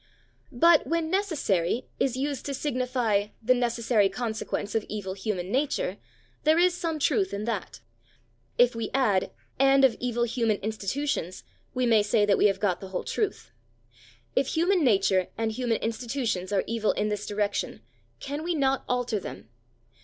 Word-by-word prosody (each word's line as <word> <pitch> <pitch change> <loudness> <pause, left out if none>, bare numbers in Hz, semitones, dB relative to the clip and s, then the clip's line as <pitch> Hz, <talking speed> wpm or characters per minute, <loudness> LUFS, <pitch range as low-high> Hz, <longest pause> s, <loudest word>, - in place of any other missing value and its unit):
But 325 +5 +5
when 330 -1 -1
"necessary" 260 - 0
is 255 -2 +1
used 280 0 -2
to 280 - -2
signify 250 -7 0
the 240 +3 +3
"necessary 235 -4 +2
consequence 220 -1 -3
of 225 - +1
evil 200 -3 -4
human 190 -2 -3
nature," 265 -8 0 0.5
there 310 +1 +4
is 355 +1 +4
some 335 -3 -2
truth 380 - +1
in 205 +1 -4
that; 185 - -4 0.8
if 245 0 +5
we 230 -1 -3
add, 215 -8 +2 0.3
"and 275 0 +6
of 245 -4 +3
evil 240 -1 -1
human 230 -3 +1
institutions," 220 - -3 0.3
we 255 0 +1
may 225 -3 +5
say 205 +1 +2
that 200 -1 +3
we - - +6
have 195 - 0
got 195 -4 0
the 195 - -7
whole 185 -1 -4
truth. 395 - -3 0.8
If 275 - +2
human 345 +2 +2
nature 195 -6 +3
and 225 -1 0
human 235 0 0
institutions 230 -4 -2
are 200 - +2
evil 225 -1 0
in 210 +1 -1
this 210 -1 -3
direction, 205 0 -2 0.4
can 285 +2 -4
we 345 0 -1
not 270 -2 +1
alter 245 -3 0
them? 115 - -9
235 Hz, 160 wpm, -27 LUFS, 205-275 Hz, 0.8 s, and